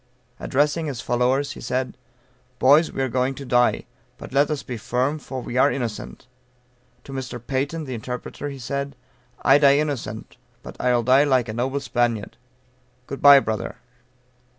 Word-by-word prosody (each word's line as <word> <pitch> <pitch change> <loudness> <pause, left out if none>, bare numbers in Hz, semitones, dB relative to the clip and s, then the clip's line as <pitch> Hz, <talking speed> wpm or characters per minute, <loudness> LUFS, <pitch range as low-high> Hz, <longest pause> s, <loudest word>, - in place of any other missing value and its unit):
Addressing 150 +4 0
his 135 -5 -4
followers, 125 +4 0
he - - -9
said, 130 0 -2 0.6
"Boys, 145 +6 +5
we 135 - -2
are - - 0
going 130 +2 0
to 140 - -8
die; 125 -1 +2 0.3
but - - -10
let 140 +1 +3
us 150 -3 -2
be 125 - -6
firm, 125 +7 -1
for 130 -3 -7
we 120 - -4
are 140 +3 +5
innocent." 115 -5 -5 0.8
To - - -11
Mr. 130 -2 -5
Peyton, 140 +6 -2
the 130 -3 -6
interpreter, 125 +5 -6
he 140 - -7
said, 140 +3 -4 0.5
"I 135 +3 +6
die 140 -1 +6
innocent, 135 -8 -4 0.3
but - - -9
I'll 125 -1 +2
die 130 +4 +5
like 130 -4 +2
a - - -3
noble 130 +4 -2
Spaniard. 120 -5 -1 0.7
Good 140 - -7
bye, 140 -1 +9
brother." 110 -3 -3
130 Hz, 165 wpm, -23 LUFS, 125-140 Hz, 0.8 s, bye